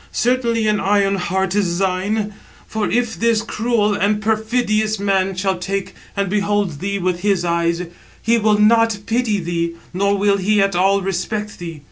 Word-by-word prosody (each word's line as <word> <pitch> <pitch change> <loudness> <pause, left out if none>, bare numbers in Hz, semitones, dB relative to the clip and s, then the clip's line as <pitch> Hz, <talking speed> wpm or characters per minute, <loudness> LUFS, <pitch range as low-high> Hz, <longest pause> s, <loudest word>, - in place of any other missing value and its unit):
Certainly 235 -2 +1
an 210 -1 +2
iron 195 0 +2
heart 190 +1 -1
is 185 -4 0
thine. 195 +3 -1 0.3
For 220 -1 -2
if 240 -1 -1
this 230 -1 +2
cruel 225 -2 0
and 205 +1 +1
perfidious 220 0 0
man 195 -1 +1
shall 190 0 -1
take 195 +1 -3 0.2
and 200 0 +1
behold 205 -1 0
783 160 +6 -6
thee 190 - -5
with 180 -1 0
his 195 -2 +1
eyes, 170 0 0 0.4
he 230 +1 +2
will 215 -1 +3
not 225 +1 +4
pity 225 -3 0
thee, 170 -1 -2 0.2
nor 200 +2 +1
will 200 0 +2
he 205 +2 +1
at 195 -1 +2
all 195 +2 +3
respect 205 +3 -3
thee. 165 -3 -7
200 Hz, 170 wpm, -19 LUFS, 190-215 Hz, 0.4 s, not